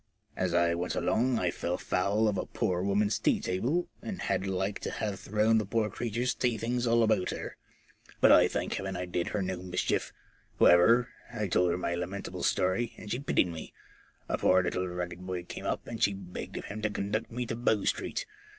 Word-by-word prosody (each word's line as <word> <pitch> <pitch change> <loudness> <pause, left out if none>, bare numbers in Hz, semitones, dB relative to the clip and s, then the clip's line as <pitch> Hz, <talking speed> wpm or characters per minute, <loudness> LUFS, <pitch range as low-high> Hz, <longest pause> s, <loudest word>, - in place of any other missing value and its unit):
As 90 -1 0
I 85 -1 +3
went 85 +1 -2
along 125 +1 +1
I 90 -4 +1
fell 90 0 -2
foul 100 +4 +1
of 105 - +1
a - - -3
poor 90 -6 -1
woman's 100 +2 +1
tea - - +2
table, 125 - 0
and 200 -4 -5
had 95 - 0
like 95 +1 -1
to - - -4
have 105 -3 -3
thrown 110 +2 +2
the - - 0
poor 110 0 0
creature's 120 +3 -1
tea 120 -3 0
things 120 +2 -1
all 115 0 +4
about 110 -4 +2
her. - - -5 0.6
But - - +6
I - - +7
thank - - -2
Heaven 95 -1 -3
I 90 - -3
did 90 -1 -2
her 105 - -1
no 95 -1 -3
mischief. 90 -1 -1 0.5
However, 115 +8 +6 0.2
I 105 - -2
told 90 0 +3
her 85 - +1
my 90 -1 -1
lamentable 90 +3 -4
story, 95 +6 +1
and 105 - -8
she 120 - 0
pitied 135 -9 +2
me. 80 -2 -7 0.5
A - - -1
poor 95 0 +4
little 90 +1 -1
ragged 90 0 -4
boy 90 -1 -4
came - - -7
up, - - -2
and 115 -2 -6
she 100 - +3
begged 90 -2 -7
of - - -5
him 105 +2 -6
to 105 - +1
conduct 105 +2 -2
me 125 +1 -3
to 115 - -3
Bow 110 -3 +1
Street. - - -1
100 Hz, 210 wpm, -30 LUFS, 90-115 Hz, 0.6 s, I